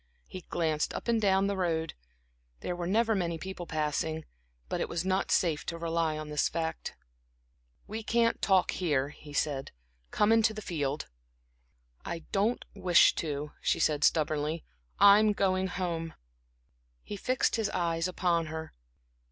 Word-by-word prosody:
He 185 - -8
glanced 160 -3 0
up - - -6
and 230 -1 +2
down 195 -1 +3
the 200 0 0
road; 165 -3 -1 0.7
there 180 - -3
were 175 -1 -4
never 225 +4 +2
many 170 -4 -1
people 180 0 -7
passing, 155 +1 -2 0.4
but - - -2
it - - -2
was 170 +1 -2
not 190 +1 0
safe 160 -4 +2
to 170 - -3
rely 165 -2 -1
on 155 0 -6
this 150 -1 +1
fact. 160 -1 -4 0.9
"We 220 +2 -5
can't 230 +1 +1
talk 190 -2 +3
here," 145 -6 0
he 150 0 -13
said. 145 -2 -1 0.4
"Come 210 +1 +2
into 225 -1 +4
the 215 - -5
field." 145 -4 -2 1.0
"I 170 -1 -5
don't 210 +4 +1
wish 175 -2 +5
to," 150 -1 -3
she - - +1
said, 150 -1 +1
stubbornly. 155 0 +1 0.3
"I'm 205 +1 +7
going 190 -1 +1
home." 170 -3 -3 0.9
He - - -6
fixed 255 +5 0
his 220 -3 0
eyes 165 -1 0
upon 175 -3 0
her. 160 0 -6
170 Hz, 150 wpm, -30 LUFS, 155-195 Hz, 1.0 s, I'm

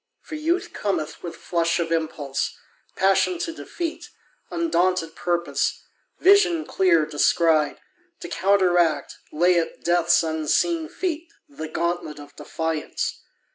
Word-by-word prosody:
For - - -11
Youth 325 +4 -1
cometh 175 -7 -2
With 170 -2 -6
flush 170 0 0
of 165 -1 -2
impulse, 155 -4 -2 0.4
passion 195 - +3
to 335 -1 -3
defeat, 330 0 -5 0.4
Undaunted 185 - 0
purpose, 175 -1 -1 0.3
vision 365 -5 +4
clear 170 -5 +3
descried, 155 0 +2 0.4
To 350 - -6
counteract, 180 - +2
lay 175 +3 +3
at 165 - -5
Death's 175 -1 +3
unseen 165 - 0
feet 335 -3 -4 0.2
The 280 - -7
gauntlet 165 -1 -2
of 145 0 -13
defiance. 160 -1 -3
175 Hz, 115 wpm, -24 LUFS, -, 0.4 s, vision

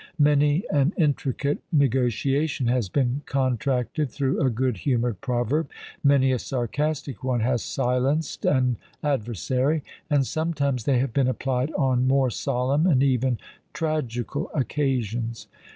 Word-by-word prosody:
Many 150 +2 +3
an 145 +4 +2
intricate 145 - 0
negotiation 135 0 +1
has 120 -4 +1
been 130 +3 0
contracted 130 +2 0
through 135 +3 -1
a 135 - +3
good 125 -1 -1
humoured 120 0 -1
proverb, 130 +4 0 0.3
many 140 -2 +4
a 130 - +1
sarcastic 140 +3 -2
one 125 -2 0
has 120 0 +1
silenced 135 +4 -1
an 125 -4 +2 0.3
adversary; 130 - 0 0.3
and 145 -3 +3
sometimes 140 -6 -1
they 135 -3 +3
have 125 -1 0
been 135 -2 +2
applied 130 +2 -1
on 130 -2 +2
more 135 -1 +3
solemn, 135 +6 0
and 135 -7 +4
even 130 -2 +2 0.4
tragical 130 -8 -2
occasions. 120 -5 -1
130 Hz, 125 wpm, -25 LUFS, 125-145 Hz, 0.4 s, many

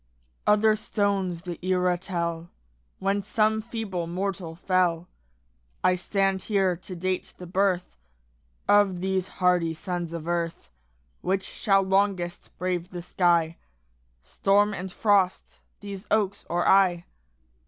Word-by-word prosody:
Other 215 +1 +5
stones 200 -5 -1
the 175 -3 -6
era 180 -1 +2
tell 170 -2 -3 0.5
When 195 +1 0
some 215 +2 +1
feeble 210 -7 -4
mortal 180 -2 -3
fell; 175 -1 +1 0.8
I 185 0 +4
stand 195 +1 0
here 195 -4 +1
to 180 +2 -9
date 185 +1 -3
the 180 - -8
birth 180 - 0 0.7
Of 205 -3 +4
these 190 -1 0
hardy 180 -4 +1
sons 175 0 -4
of 165 -1 -6
earth. 170 - -2 0.5
Which 190 +1 0
shall 195 -3 +1
longest 190 -2 0
brave 180 -1 -2
the 175 -2 -7
sky, 170 -2 +2 0.7
Storm 200 - +2
and 190 0 -5
frost 200 -3 +1 0.2
these 200 0 -8
oaks 205 -2 0
or 175 +1 +1
I? 185 -3 +4
185 Hz, 120 wpm, -26 LUFS, 175-195 Hz, 0.8 s, Other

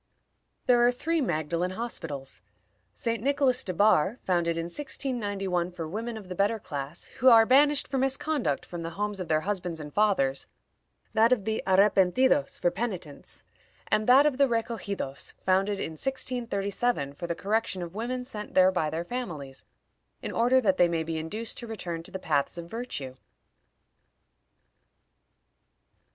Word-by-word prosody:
There 245 -1 +5
are - - +4
three 320 +6 -1
Magdalen 170 - -1
Hospitals: 150 - -6 0.5
St. 230 -1 -2
Nicholas 265 -1 +2
de 185 - -3
Barr, 200 +2 +3
founded 170 -2 +1
in 165 - -1
1691 200 - -2
for 165 -2 -6
women 225 +6 -4
of 205 -4 -10
the 180 - -5
better 200 +5 +1
class, 145 -4 -6 0.2
who 260 - +8
are 225 -2 +8
banished 285 +4 +4
for 270 - -1
misconduct 270 - 0
from 175 -1 -7
the 165 - -4
homes 205 -1 -2
of 180 - -4
their 155 -1 +2
husbands 180 -3 -3
and 150 -1 -8
fathers; 185 -11 +1 0.7
that 225 +2 +4
of 225 -6 +2
the 220 0 -1
Arrepentidos, 200 +8 +3
for 175 - +1
penitents; 180 -11 -6 0.5
and 215 - +2
that 265 +4 +7
of 285 -3 +1
the 280 - +6
Recogidos, 220 - -3
founded 195 +2 +1
in 160 - -3
1637, 225 - -2
for 175 +3 -6
the 170 - -2
correction 200 -1 -1
of 170 0 -8
women 250 +4 -3
sent 210 -5 -6
there 185 0 +6
by 170 -4 0
their 165 +2 -3
families, 165 - -6 0.6
in - - -3
order 245 +3 +3
that 195 -6 +2
they 175 - +5
may 165 -1 -1
be 160 0 -3
induced 215 +9 -4
to 240 - -7
return 180 -7 -5
to 165 - -9
the - - -5
paths 150 -4 0
of 170 - -6
virtue. 170 - -6
200 Hz, 160 wpm, -28 LUFS, 170-240 Hz, 0.7 s, who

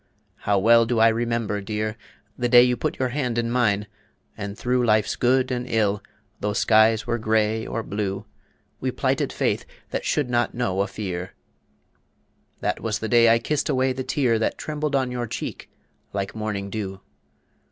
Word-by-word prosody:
How 100 - +4
well 115 +3 +5
do 120 0 0
I 115 +1 +6
remember, 115 -2 -1
dear, 105 +1 -3 0.4
The 120 0 -1
day 120 0 +8
you 125 0 +2
put - - -2
your 130 -1 0
hand 125 -3 -2
in 115 0 0
mine, 105 -5 +2 0.5
and 100 +1 -6
through 125 0 +1
Life's 110 -2 +2
good 130 +1 +2
and 125 0 -3
ill, 105 -2 +1 0.4
tho' 105 0 -1
skies 110 +1 +4
were 120 - -1
gray 110 0 +1
or 115 - -3
blue, 100 -1 -3 0.5
We - - -1
plighted - - 0
faith - - 0 0.3
that - - -2
should 145 -4 0
not 120 -1 0
know 100 -6 0
a 100 - 0
fear. 90 -4 -5 1.3
That - - -1
was 110 -2 -1
the 110 - -4
day 115 -1 +6
I 115 - +6
kissed 145 +7 -1
away 130 -2 +2
the 130 +1 -4
tear 130 -4 +1
That 110 - 0
trembled 150 -1 -2
on 130 -2 +1
your 120 -1 -3
cheek - - -6 0.4
like 100 -1 -3
morning 105 -2 -4
dew. 95 -3 -5
115 Hz, 175 wpm, -24 LUFS, 105-125 Hz, 1.3 s, day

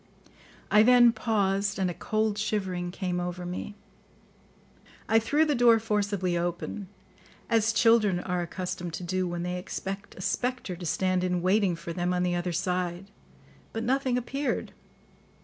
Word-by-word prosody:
I 210 - +7
then 240 +1 +7
paused, 200 -4 0
and 190 -1 +1
a 175 - -2
cold 215 +2 -1
shivering 190 -4 -2
came 180 0 -3
over 180 0 -4
me. 180 +3 -5 1.3
I 225 - +5
threw 290 +8 +2
the 300 - +1
door 240 -3 +6
forcibly 205 -4 -1
open, 175 +3 -3 0.6
as 225 -1 +3
children 220 -4 +4
are 180 0 -2
accustomed 175 -1 -4
to - - -6
do 185 +1 -1
when 175 0 -3
they 180 0 -2
expect 195 +2 -6
a - - -9
spectre 250 -2 -2
to 175 0 -8
stand 185 +2 +1
in 180 -1 0
waiting 190 -1 +3
for 170 0 -6
them 180 +1 -1
on 180 - +1
the 180 0 +1
other 175 0 -1
side; 180 +2 -2 0.6
but 225 - -3
nothing 260 0 +1
appeared. 275 +4 -2
190 Hz, 155 wpm, -28 LUFS, 180-220 Hz, 1.3 s, I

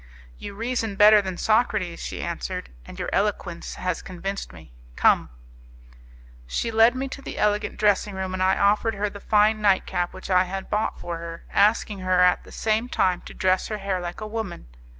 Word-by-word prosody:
"You 200 - -8
reason 225 -1 -2
better 210 +1 +7
than 190 -2 -5
Socrates," 215 -6 +1
she - - -5
answered, - - -5 0.2
"and - - -10
your - - -4
eloquence 195 -4 -2
has 185 0 -2
convinced 195 +2 -5
me. 80 -6 -15 0.2
Come!" - - +3 1.2
She 230 - -2
led 225 +2 +5
me 265 +1 -2
to 275 - -8
the - - -7
elegant 210 0 0
dressing 205 -1 +2
room, 190 -1 -3
and 185 - -3
I 190 +1 +3
offered 210 +2 +2
her 205 +1 -2
the 205 - -9
fine 215 +1 +3
night 200 -2 +3
cap 175 -1 -2
which 185 +1 -8
I 185 0 +4
had 190 +1 -6
bought 210 +1 -1
for 170 -1 -5
her, 165 0 -8
asking 210 0 +2
her 185 0 +1
at 180 0 +4
the - - -15
same 220 +2 0
time 185 -6 +1
to - - -11
dress 185 0 +1
her 215 - -3
hair 195 -2 -2
like 175 +3 -6
a - - -4
woman. 215 - -5
200 Hz, 195 wpm, -24 LUFS, 185-215 Hz, 1.2 s, better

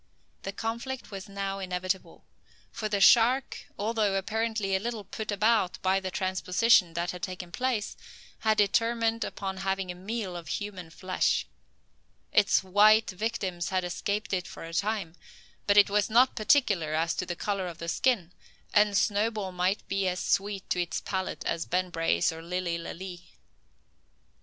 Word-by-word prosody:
The 195 - -4
conflict 235 +5 -4
was 195 0 -7
now 195 0 -3
inevitable: 185 0 -3 0.5
for 215 - -4
the 205 -1 0
shark, 240 +6 +4
although 210 -1 0
apparently 215 0 -1
a - - +2
little 225 0 -4
put 220 +1 -5
about 210 -2 +2
by 190 +1 +3
the 190 -1 -4
transposition 185 0 +2
that 170 +1 -1
had 180 - -8
taken 180 -1 -5
place, 250 -2 -1 0.4
had 220 -1 +2
determined 230 +2 +2
upon 190 -1 -4
having 190 -1 -2
a - - -6
meal 190 +1 -4
of 170 -1 -7
human 195 -5 -5
flesh. 185 +3 0 0.9
Its 200 - +4
white 210 +4 +5
victims 185 -3 -3
had 185 -1 0
escaped 200 +4 -2
it 180 -1 -1
for - - -9
the 165 - -9
time, 200 -2 -1 0.5
but 200 0 +4
it 205 - +8
was 210 +1 +2
not 245 +4 +4
particular 205 - +2
as 165 +1 +1
to - - -3
the 175 - -3
colour 195 0 -2
of 170 -2 -7
the 170 - -6
skin, 185 -1 +1 0.4
and 205 -1 +4
Snowball 210 -1 0
might 180 +2 -1
be 195 -1 0
as 180 0 -1
sweet 195 +1 -1
to 180 - +2
its 175 +2 -2
palate 190 -1 -3
as 165 - -1
Ben 180 0 0
Brace 165 +1 +1
or 160 0 -8
Lilly 170 0 -2
Lalee. 175 0 -8
195 Hz, 160 wpm, -28 LUFS, 180-215 Hz, 0.9 s, it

